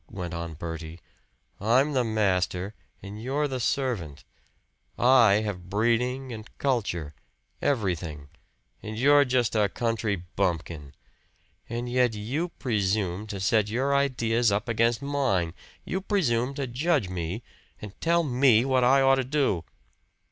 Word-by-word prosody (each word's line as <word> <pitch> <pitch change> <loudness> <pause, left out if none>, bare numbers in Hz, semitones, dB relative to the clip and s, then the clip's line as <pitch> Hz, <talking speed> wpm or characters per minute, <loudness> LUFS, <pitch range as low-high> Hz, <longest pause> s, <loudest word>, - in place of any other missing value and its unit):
went 90 -3 -6
on 85 -1 -5
Bertie. 80 +1 -7 0.6
"I'm 130 +8 +2
the 130 -2 +2
master, 95 -3 0 0.3
and 100 +2 -8
you're 140 +5 0
the 130 -2 -4
servant. 115 - -2 0.7
I 120 -5 +5
have 90 -3 -5
breeding 125 +5 0
and 110 0 -9
culture 100 - -1 0.5
everything 85 - -2 0.5
and 110 0 -6
you're 145 +3 +5
just 125 -3 +1
a 105 -2 +3
country 115 -2 -1
bumpkin. 85 -5 -3 0.7
And 120 +1 -3
yet 125 -2 +2
you 135 +12 -2
presume 105 - -1
to 100 -2 -5
set 105 +2 +2
your 130 +5 0
ideas 120 -5 +2
up 100 +4 -1
against 115 +1 +1
mine! 130 -13 0 0.3
You 190 - -2
presume 135 - 0
to 140 - -2
judge 130 - 0
me, 90 +4 -4 0.4
and 105 -2 -9
tell 170 +1 +3
me 125 -4 +4
what 130 -2 +2
I 135 +2 +5
ought 135 0 +5
to - - -3
do!" 130 - 0
115 Hz, 135 wpm, -26 LUFS, 95-130 Hz, 0.7 s, I